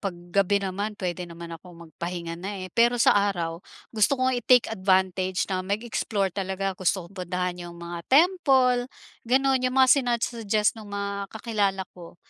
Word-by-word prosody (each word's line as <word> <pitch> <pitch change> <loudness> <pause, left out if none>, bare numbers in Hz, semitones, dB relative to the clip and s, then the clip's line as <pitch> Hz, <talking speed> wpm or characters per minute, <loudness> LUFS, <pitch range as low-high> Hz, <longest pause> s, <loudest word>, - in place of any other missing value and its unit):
pag 195 -3 -3 0.2
gabi 200 +2 +2
naman 200 +3 -3
puwede 180 -2 -4
naman 170 0 -9
akong 170 0 -11
magpahinga 170 0 -5
na, 190 +1 -5
eh. 185 - -9
Pero 235 +1 +3
sa 235 - +5
araw 175 -5 0 0.3
gusto 225 +5 +3
ko 255 - 0
nga 260 - +2
i-take 245 -1 +4
advantage 185 -2 +1
na 185 -1 0
mag-explore 200 -1 -2
talaga 195 0 -2
gusto 185 0 -1
kong 170 - -15 0.2
puntahan 180 0 -2
yung 170 - -11
mga 170 0 -7
temple 265 -6 +4 0.4
gano'n, 265 +2 +3
yung 255 - -5
mga 260 -1 +6
sina-suggest 230 -3 0
nung 210 - -11
mga 200 0 -4
kakilala 205 -4 -1
ko 175 -1 -13
200 Hz, 165 wpm, -25 LUFS, 180-230 Hz, 0.4 s, mga